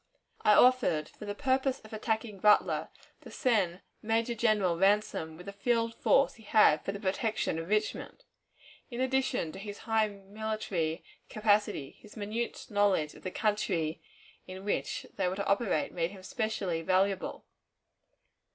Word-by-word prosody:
I 210 - +5
offered, 245 -12 +4
for 210 - -11
the 205 0 -4
purpose 265 +1 +1
of 215 - -14
attacking 220 -1 -2
Butler, 210 +2 +3 0.3
to - - -12
send 200 - +1 0.2
Major 225 +2 0
General 215 -6 +2
Ransom 195 -4 +1
with 180 - -11
the 200 - -7
field 230 +2 0
force 275 +4 +3
he 225 - -17
had 205 -8 +4
for - - -2
the 200 - -6
protection 200 -3 -1
of 165 +2 -6
Richmond. 215 0 -1 0.7
In 240 -2 -6
addition 260 -9 0
to 190 - -9
his 205 0 -7
high 225 -1 +2
military 200 -5 -3 0.3
capacity, 210 -9 0
his 210 +1 -15
minute 215 +3 -3
knowledge 200 -7 +2
of - - -15
the 185 - -4
country 185 -7 -1 0.5
in 185 +1 -8
which 205 - -2
they - - +1
were 180 - -1
to 200 - -3
operate 200 -6 +1
made 170 -1 -1
him 190 -1 -12
specially 215 -8 -2
valuable. 190 +3 0
205 Hz, 150 wpm, -30 LUFS, 185-225 Hz, 0.7 s, I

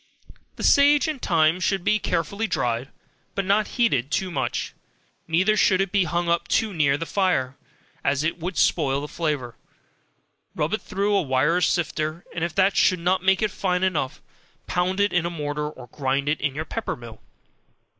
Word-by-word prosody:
The - - -7
sage 285 +2 +5
and 305 -5 -4
thyme 160 +1 +2
should 190 0 0
be 215 +3 +2
carefully 200 +6 -1
dried, 125 - -1 0.5
but 195 - -1
not 205 +2 +2
heated 140 - +2
too 185 +6 -1
much, 130 -6 -2 0.5
neither 185 +6 +2
should 190 -3 +3
it 195 -2 0
be 200 -3 +2
hung 170 +2 -1
up 170 0 +1
too 220 -2 +1
near 145 -4 +2
the 165 - -4
fire, 170 -10 0 0.5
as 140 +1 +1
it 165 +2 -1
would 180 +2 -4
spoil 140 -4 +2
the 145 - -5
flavor, 145 -8 -3 1.0
rub 150 +5 -1
it 215 - -1
through 200 +2 -1
a 195 - +3
wire 145 +5 +1
sifter, 155 -1 -1
and 165 - -3
if 170 -1 -3
that 195 0 +3
should 185 - +4
not 180 +2 +1
make 190 +2 +3
it 215 - +1
fine 180 -1 -1
enough, 160 -8 -1 0.4
pound 180 +2 -1
it 205 0 +2
in 175 -1 +2
a - - -2
mortar 150 -2 -3
or 130 -4 -11
grind 135 +2 -2
it 150 +1 0
in 140 -2 -1
your 155 +1 -3
pepper 225 +5 -4
mill. 115 -2 -12
170 Hz, 185 wpm, -24 LUFS, 145-195 Hz, 1.0 s, sage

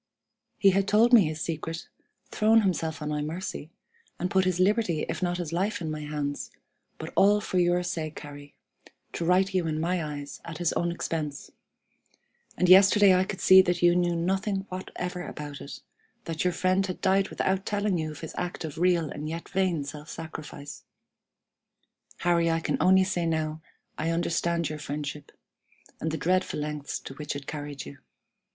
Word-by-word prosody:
"He 195 - +5
had 195 +1 +1
told 230 +4 +4
me 220 -7 +8
his 155 0 -4
secret, 165 0 -4 0.4
thrown 220 +1 +4
himself 165 -6 -1
on 150 - -3
my 150 0 -1
mercy, 155 0 -5 0.5
and 180 +1 -2
put 190 -1 +3
his 185 -1 0
liberty 185 -4 +2
if - - -4
not 175 -1 0
his 170 -3 -4
life 200 +4 0
in 160 -3 -3
my 155 - -4
hands, 150 -1 -3 0.5
but - - -7
all 205 +1 +5
for 185 -2 -1
your 175 0 +2
sake, 160 -4 -4
Harry, 145 -1 -11 0.6
to - - -3
right 185 +3 +3
you 180 -3 +1
in 155 -1 -1
my 175 +1 0
eyes 145 -2 -6
at 165 -2 -7
his 175 -1 0
own 175 0 0
expense. 155 -4 -4 1.1
And 180 - +2
yesterday 195 +1 +7
I 185 +1 +3
could 190 - -6
see 190 0 +8
that 180 -1 -1
you 175 0 +6
knew 175 -1 +2
nothing 195 +3 -1
whatever 180 -1 -5
about 145 -4 -7
it, 140 - -9 0.4
that 165 -1 -2
your 180 -1 +1
friend 185 +2 +2
had 185 - -5
died 195 +1 +2
without 190 0 0
telling 205 -3 0
you 155 -1 -2
of 150 - -9
his 160 - -7
act 175 -2 -4
of 155 0 -7
real 175 -2 +3
and 150 +1 -5
yet 165 +1 -6
vain 185 -5 0
self 150 +2 -8
sacrifice! 155 -3 -8 1.4
Harry, 170 -1 +3
I 165 0 +1
can - - -1
only 190 +1 +6
say 185 -2 -1
that 165 -1 +1
now 155 0 -3 0.4
I 160 +2 0
understand 170 0 0
your 155 0 -5
friendship, 145 0 -5 0.7
and 160 - -2
the 160 - -2
dreadful 185 +3 0
lengths 150 -1 -4
to - - -8
which 150 +1 -5
it 140 -1 -6
carried 145 -3 -6
you. 70 - -11
170 Hz, 185 wpm, -27 LUFS, 155-185 Hz, 1.4 s, me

